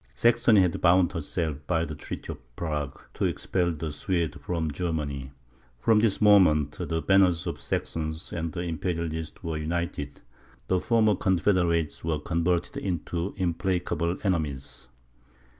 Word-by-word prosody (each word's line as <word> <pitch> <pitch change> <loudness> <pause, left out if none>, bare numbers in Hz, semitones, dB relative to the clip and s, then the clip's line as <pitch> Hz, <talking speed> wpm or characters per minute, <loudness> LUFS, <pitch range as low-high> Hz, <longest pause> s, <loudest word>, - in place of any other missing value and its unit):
Saxony 115 - +5
had 90 -3 +1
bound 90 0 +5
herself, 80 -1 -2
by 85 -2 +1
the 75 - -6
treaty - - -6
of 60 -1 -19
Prague, 75 -5 -3
to - - -1
expel 90 -2 0
the 80 -1 -4
Swedes 85 +3 -1
from 80 -3 -2
Germany. 70 -5 -3 0.5
From 110 - +4
this 110 -2 +2
moment, 90 -9 +5
the 80 +2 -3
banners 95 -3 +4
of 85 - -3
the - - -17
Saxons 80 0 -3
and 85 +1 -3
Imperialists 80 -1 -3
were 80 -1 -2
united: 80 -2 -3 0.5
the 95 - +2
former 110 +1 +3
confederates 90 -4 +1
were 80 -2 0
converted 85 +2 0
into 90 0 -3
implacable 85 -1 -1
enemies. 75 -10 -2
85 Hz, 135 wpm, -27 LUFS, 80-90 Hz, 0.5 s, Saxony